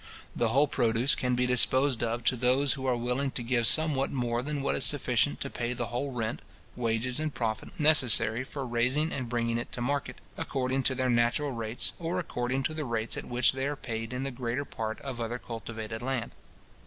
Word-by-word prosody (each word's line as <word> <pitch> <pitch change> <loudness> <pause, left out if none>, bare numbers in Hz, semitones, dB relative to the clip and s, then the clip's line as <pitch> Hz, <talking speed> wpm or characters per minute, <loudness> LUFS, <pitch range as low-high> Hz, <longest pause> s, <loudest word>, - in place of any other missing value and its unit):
The 120 - +1
whole 140 +6 +3
produce 120 0 +2
can 125 -1 0
be 125 +1 +1
disposed 130 +1 +3
of 120 0 -2
to 130 - +2
those 130 +3 +3
who 135 -1 -4
are 125 -2 +2
willing 125 +3 -1
to 125 - -4
give 120 -1 +2
somewhat 150 -4 +3
more 120 -2 -1
than 145 +1 -3
what - - +1
is - - +1
sufficient 130 -1 +3
to 140 - -3
pay 120 0 -2
the 120 -2 -4
whole 135 +3 -2
rent, 115 -3 -3 0.3
wages, 120 +2 0
and 155 0 -1
profit, 110 -5 -4
necessary 130 -6 +5
for 135 +1 -6
raising 125 +6 +1
and 130 -3 -3
bringing 115 -1 0
it 120 - -6
to - - -3
market, 140 +3 -2 0.2
according 130 0 -1
to 130 0 +1
their 130 -1 +1
natural 120 +5 +1
rates, 115 -1 -2
or 170 +1 -2
according 130 -6 -2
to 155 - -1
the 155 -1 -3
rates 115 -3 -2
at - - -6
which 120 +1 +3
they 135 +1 -2
are 145 - -2
paid 115 -3 -5
in 125 +1 -3
the 135 - -3
greater 125 +2 -3
part 110 -3 -5
of 130 -4 -5
other 115 +1 -3
cultivated 115 -1 -7
land. 130 -1 -2
125 Hz, 210 wpm, -29 LUFS, 120-135 Hz, 0.3 s, necessary